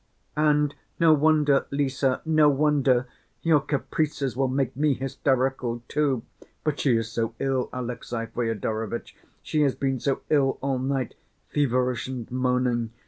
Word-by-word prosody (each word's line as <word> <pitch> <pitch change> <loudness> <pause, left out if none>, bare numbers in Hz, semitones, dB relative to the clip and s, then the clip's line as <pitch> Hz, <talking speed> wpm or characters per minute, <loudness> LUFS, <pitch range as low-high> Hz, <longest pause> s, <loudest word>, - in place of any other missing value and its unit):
"And 150 -1 +3 0.3
no 165 -2 +6
wonder, 150 -2 +3
Lise, 140 -1 -2 0.2
no 155 -2 +5
wonder... 140 -3 +2 0.4
your 160 -3 +5
caprices 140 -1 -2
will 135 +1 +1
make 130 -1 -1
me 145 0 +2
hysterical 130 -2 -1
too. 140 -6 0 0.4
But 150 -2 -1
she 125 -5 +3
is 115 0 -3
so 115 0 -2
ill, 135 -2 0
Alexey 120 -2 -4
Fyodorovitch, 115 -1 -3 0.3
she 155 - 0
has 140 -3 +2
been 135 -2 -1
so 135 +1 -1
ill 140 -3 +3
all 135 -1 -1
night, 130 -1 -1 0.4
feverish 125 -4 +1
and 125 -3 -6
moaning! 125 -2 +1
135 Hz, 140 wpm, -26 LUFS, 125-145 Hz, 0.4 s, no